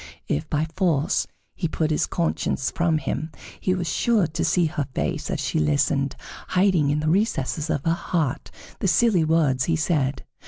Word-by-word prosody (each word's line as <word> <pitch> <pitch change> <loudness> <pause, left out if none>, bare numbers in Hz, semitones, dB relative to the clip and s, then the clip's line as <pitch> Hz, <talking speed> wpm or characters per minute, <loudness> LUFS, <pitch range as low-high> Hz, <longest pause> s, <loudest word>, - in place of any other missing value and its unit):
If, 75 - -2
by 155 +1 +1
force, 165 -6 +1 0.3
he 170 - -2
put 160 0 -1
his 150 - +1
conscience 165 -5 -1
from 170 -2 +1
him, 155 +2 -3 0.3
he 185 - +1
was 175 -2 -3
sure 225 -2 +2
to 160 +1 -3
see 175 -2 +2
her 155 -3 -2
face - - -2
as - - -2
she - - -1
listened, 130 - +1 0.3
hiding 185 -6 +3
in 150 +1 +1
the 155 - -2
recesses 160 - 0
of 140 -3 -1
her 165 - +3
heart 165 -5 -2 0.3
the - - 0
silly 220 -9 +4
words 150 -6 +2
he 165 - +1
said. 150 -4 0
160 Hz, 180 wpm, -24 LUFS, 145-175 Hz, 0.3 s, silly